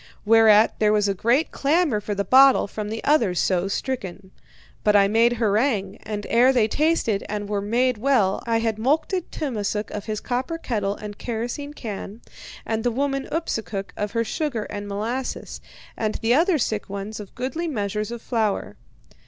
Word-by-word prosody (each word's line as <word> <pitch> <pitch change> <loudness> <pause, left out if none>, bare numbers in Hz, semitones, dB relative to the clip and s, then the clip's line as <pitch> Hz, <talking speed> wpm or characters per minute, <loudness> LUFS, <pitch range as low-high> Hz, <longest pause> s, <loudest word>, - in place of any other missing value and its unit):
Whereat 220 0 +5
there 210 -1 +3
was 210 -1 +2
a 200 - +1
great 240 - +1
clamour 285 -6 +1
for 205 0 -3
the 200 - 0
bottle 265 +6 +6
from 210 +1 -5
the 225 +1 -5
others 230 - +2
so 185 0 +1
stricken. 195 -4 -4 0.5
But 210 0 +3
I 200 -1 +6
made 230 +3 +3
harangue, 215 -3 0
and 210 -1 -5
ere 245 +3 +5
they 240 -5 +3
tasted 290 -6 +1
and 205 -1 -3
were 205 -1 -1
made 235 +3 +1
well 225 -7 +2
I 230 -1 +2
had 225 -1 -1
mulcted 315 - 0
Tummasook 215 -7 -3
of 205 -1 -5
his 215 -1 -3
copper 255 +9 -3
kettle 205 -9 -2
and 210 -1 -9
kerosene 245 +5 -4
can, 215 -1 -7 0.4
and 220 0 -2
the 245 - +2
woman 275 +2 -1
Ipsukuk 225 -11 -3
of 210 +1 -3
her 230 -1 +1
sugar 255 -2 -2
and 205 0 -5
molasses, 225 +6 -4 0.3
and 215 -1 -2
the 225 +2 +1
other 335 +5 +3
sick 215 -6 -2
ones 200 +2 -5
of 205 -2 -10
goodly 265 +8 -3
measures 210 -6 -2
of 235 -1 -7
flour. 220 -4 -1
225 Hz, 175 wpm, -23 LUFS, 205-260 Hz, 0.5 s, bottle